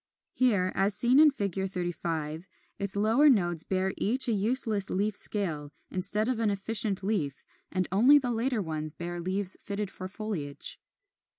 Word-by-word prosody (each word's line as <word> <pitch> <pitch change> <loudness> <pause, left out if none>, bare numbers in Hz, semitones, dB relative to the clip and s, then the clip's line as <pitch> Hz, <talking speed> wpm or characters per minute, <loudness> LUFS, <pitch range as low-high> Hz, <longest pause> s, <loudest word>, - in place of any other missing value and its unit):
Here, 205 -8 +2
as 195 +1 +2
seen 250 +3 +4
in 310 0 +8
Fig. 200 - -3 0.2
35, 170 -2 -4 0.3
its 200 -1 +1
lower 225 +9 +4
nodes 175 - +2
bear 190 0 -1
each 255 +6 0
a - - +1
useless 215 -1 +1
leaf 205 +2 -1
scale 160 -11 0 0.2
instead 210 +4 0
of 255 -3 -1
an 225 -2 +1
efficient 200 0 0
leaf, 175 -10 -2 0.3
and 185 -1 -1
only 245 +10 +6
the 255 -4 -1
later 235 -1 -1
ones 155 -2 -4
bear 175 +1 -6
leaves 190 +2 0
fitted 200 -1 -4
for 185 - -7
foliage. 185 -8 -2
200 Hz, 160 wpm, -28 LUFS, 180-225 Hz, 0.3 s, in